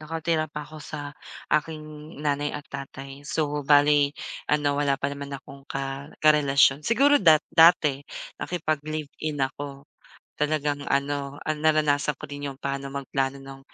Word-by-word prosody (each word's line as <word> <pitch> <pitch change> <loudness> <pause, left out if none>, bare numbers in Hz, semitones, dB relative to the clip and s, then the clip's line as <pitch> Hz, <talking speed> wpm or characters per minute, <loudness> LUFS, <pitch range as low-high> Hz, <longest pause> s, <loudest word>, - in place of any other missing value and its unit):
nakatira 160 0 -1
pa 150 0 -6
ako 155 +1 -11
sa 145 -1 -7 0.4
aking 155 0 -2
nanay 145 0 +1
at 145 0 -6
tatay, 135 0 -8
so 150 -2 -1
bale 145 0 +4 0.3
ano 145 -1 +2
wala 140 -1 +2
pa 140 +1 -2
naman 140 0 -6
akong 135 0 -14
ka 135 +1 -4 0.2
karelasyon, 140 -2 +5
siguro 275 - +4
dat 160 -5 +6
dati 160 -4 +6 0.4
nakipag-live-in 155 -3 -2
ako. 140 +1 -7 0.6
Talagang 150 -1 0
ano, 140 0 -1
ah, 155 - 0
naranasan 150 -2 +2
ko - - -10
rin 145 -1 -5
yung 135 - -7
paano 140 0 -4
magplano 135 0 -2
nung, 135 0 -11
145 Hz, 140 wpm, -26 LUFS, 140-155 Hz, 0.6 s, dat